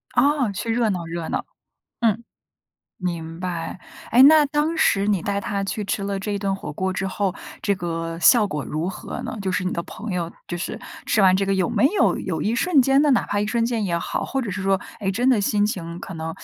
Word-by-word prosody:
哦， 280 -6 +3
去 225 +4 -3
热 230 -1 +2
闹 180 -4 -2
热 165 0 -4
闹， - - -2 0.6
嗯。 230 0 +1 0.8
明 165 -2 -4
白。 180 -1 -4 0.3
诶， 240 - +7
那 300 +2 +8
当 300 +3 0
时 200 -10 +3
你 200 -5 +1
带 200 0 -1
她 200 0 -2
去 210 +2 -3
吃 200 0 -2
了 200 0 -2
这 205 +1 -3
一 - - 0
顿 195 -1 -1
火 195 - -7
锅 190 +5 -2
之 190 +1 -2
后， 190 -1 -1 0.3
这 200 - +1
个 165 -2 -4
效 220 +6 +6
果 150 -6 -3
如 155 +3 -3
何 190 - -6
呢？ - - -5
就 190 -1 -1
是 185 - 0
你 185 - -1
的 170 - -1
朋 215 +5 -7
友， 170 -2 -2 0.2
就 175 - -3
是 175 - -4 0.3
吃 - - +2
完 190 -2 +6
这 195 - +1
个， 195 - 0
有 185 -2 +1
没 - - 0
有 405 - +2
有 - - -3
一 215 - +1
瞬 305 +5 +3
间 270 +2 +4
的 300 - +3
哪 255 - +3
怕 205 - -1
一 210 - 0
瞬 230 +1 +1
间 230 -2 -1
也 175 -4 0
好， - - -3
或 270 - -2
者 235 -6 -3
是 190 +1 -4
说， 195 0 +2 0.2
哎， 195 - -1
真 235 +6 0
的 250 -6 +4
心 205 +1 +2
情 170 -5 -4
可 190 - -8
能 160 0 -4
195 Hz, 260 characters per minute, -23 LUFS, 180-230 Hz, 0.8 s, 那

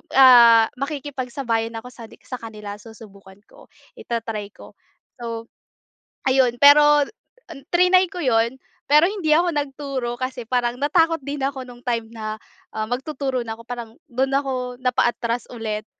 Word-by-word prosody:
ah, 235 -4 +8
makikipagsabayan 260 -5 -3
ako 250 +2 -12
sa 235 -2 -11 0.2
sa 255 - -5
kanila 210 -2 -8
susubukan 200 -3 -15
ko - - -18 0.3
i-ta-try 225 -3 -4
ko. - - -14 0.5
So 230 -1 -5 0.8
ayun, 260 -2 +3
pero 295 0 +7 0.7
triny 365 +1 +5
ko 360 - -7
'yon 235 0 +1 0.3
pero 300 +3 +6
hindi 380 -7 -2
ako 345 +2 +3
nagturo 275 -4 -3
kasi 255 -1 -4
parang 245 -1 0
natakot 325 +2 +2
din 285 0 -5
ako 270 -1 -2
nung 245 -1 -13
time 230 -2 -2
na, 215 -1 -5 0.4
ah, 215 0 -2
magtuturo 265 0 -2
na 225 - -4
ako 230 - -13
parang 235 -2 -7
dun 260 +2 0
ako 255 -3 -2
napaatras 240 -1 0
ulit, 215 -2 -4
250 Hz, 140 wpm, -22 LUFS, 230-280 Hz, 0.8 s, ah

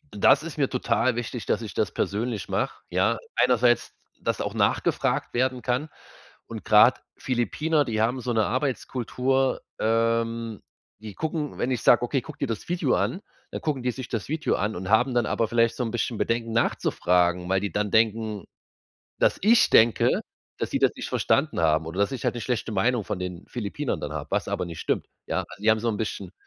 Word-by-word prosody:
Das 135 +8 +5
ist 165 -2 -7
mir 140 -3 +1
total 125 -1 +1
wichtig, 120 -1 -4
dass - - +1
ich - - -7
das - - 0
persönlich 110 -1 -2
mach, - - -2
ja. - - +1 0.2
Einerseits, 125 -1 +3 0.3
dass - - -1
auch - - -3
nachgefragt - - 0
werden 130 0 0
kann. 130 +5 -1 0.6
Und - - -8
grad - - +6 0.2
Philippiner, 145 +5 0
die 110 -3 -2
haben 120 +4 +1
so 125 0 -3
'ne 110 -2 +2
Arbeitskultur, 130 0 -1 0.2
ähm, 115 0 0 0.4
die 105 -3 -9
gucken, 155 -2 -3
wenn 125 - -1
ich 125 - -1
sag: 120 - +5
„Okay, 130 +2 0
guck 155 +1 -11
dir - - -1
das 115 +5 -5
Video 175 0 +1
an“, 190 - -1 0.3
dann - - -5
gucken 145 -5 -1
die 125 - 0
sich 130 0 -7
das 115 +1 -4
Video 155 0 0
an 105 +2 -1
und 90 +1 -5
haben 125 +4 +3
dann 120 -2 +3
aber 115 - 0
vielleicht 115 0 +2
so 125 - -2
'n 115 - -2
bisschen 120 -1 -2
Bedenken 115 0 -1
nachzufragen, 90 -5 +1
weil 95 0 +2
die 100 - -3
dann 105 +3 -1
denken, 110 -2 +1 0.7
dass - - +2
ich 225 +3 +5
denke, 115 0 +4 0.4
dass - - -2
sie - - -1
das - - +4
nicht - - -6
verstanden 145 - +1
haben 80 -1 +2
oder 90 +4 -5
dass 100 +3 +2
ich 130 - -5
halt - - 0
'ne 120 - -4
schlechte 120 -3 -2
Meinung 110 +3 +1
von 95 - -4
den 90 -1 -6
Philippinern 120 +4 -3
dann 75 0 -5
hab, 75 -2 -5
was - - 0
aber - - -2
nicht 85 -2 -8
stimmt, - - -1 0.2
ja? - - -1
Also 100 - -12
die 110 - +5
haben 110 - +2
so 115 - 0
'n 105 - -2
bisschen, 100 -4 -4
115 Hz, 205 wpm, -25 LUFS, 105-130 Hz, 0.7 s, grad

